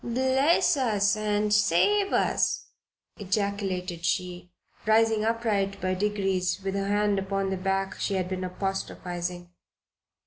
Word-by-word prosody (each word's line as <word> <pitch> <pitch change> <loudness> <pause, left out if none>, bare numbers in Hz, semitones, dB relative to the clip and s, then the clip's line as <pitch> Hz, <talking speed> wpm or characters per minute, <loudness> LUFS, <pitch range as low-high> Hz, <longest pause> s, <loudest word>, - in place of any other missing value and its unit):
"Bless 265 +8 +2
us 210 -5 +2
and 210 0 0
save 300 - +3
us!" - - +1 0.5
ejaculated 195 -3 -2
she, 180 0 -2 0.4
rising 220 0 +3
upright 215 -4 0
by 185 0 -1
degrees 195 -2 0
with 195 0 -2
her 195 0 -2
hand 205 0 +1
upon 195 0 -2
the - - 0
back 195 +1 -1
she 200 - -1
had 185 -1 -1
been 185 0 -4
apostrophizing. 180 -2 -4
195 Hz, 125 wpm, -27 LUFS, 185-215 Hz, 0.5 s, save